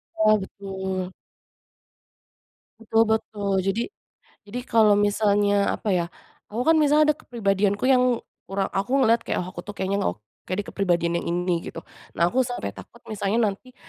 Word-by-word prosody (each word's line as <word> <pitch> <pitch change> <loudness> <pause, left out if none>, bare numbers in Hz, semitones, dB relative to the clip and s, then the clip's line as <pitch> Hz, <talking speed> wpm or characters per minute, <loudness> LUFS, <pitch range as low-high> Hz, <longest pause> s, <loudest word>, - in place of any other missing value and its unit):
Iya, 215 0 +4
betul. 190 -1 -5 1.7
Betul 225 0 +3
betul. 205 -2 -1
Jadi 195 +5 0 0.6
jadi 230 +5 -5
kalau 220 -4 +4
misalnya 205 0 +2
apa - - -5
ya, 175 -2 +1 0.4
aku 230 +4 -3
kan 325 - +6
misalnya 300 0 +4
ada 300 - 0
kepribadianku 205 -4 0
yang 250 -2 +3 0.2
kurang, 195 0 -2
aku 195 +6 -2
ngeliat 230 -1 +3
kayak, - - -1
oh 180 - -7
aku 175 - -7
tuh 205 - -7
kayaknya 195 +1 -1
ngeok 90 +4 -2 0.3
kayak 185 +3 -2
di - - -21
kepribadian 170 -3 +1
yang - - -6
ini 175 0 0
gitu. - - -8 0.3
Nah 170 +1 +2
aku 255 - -1
sampai 245 0 -4
takut 235 - -14
misalnya 215 +1 +1
nanti 250 +6 -12
205 Hz, 160 wpm, -24 LUFS, 190-225 Hz, 1.7 s, kan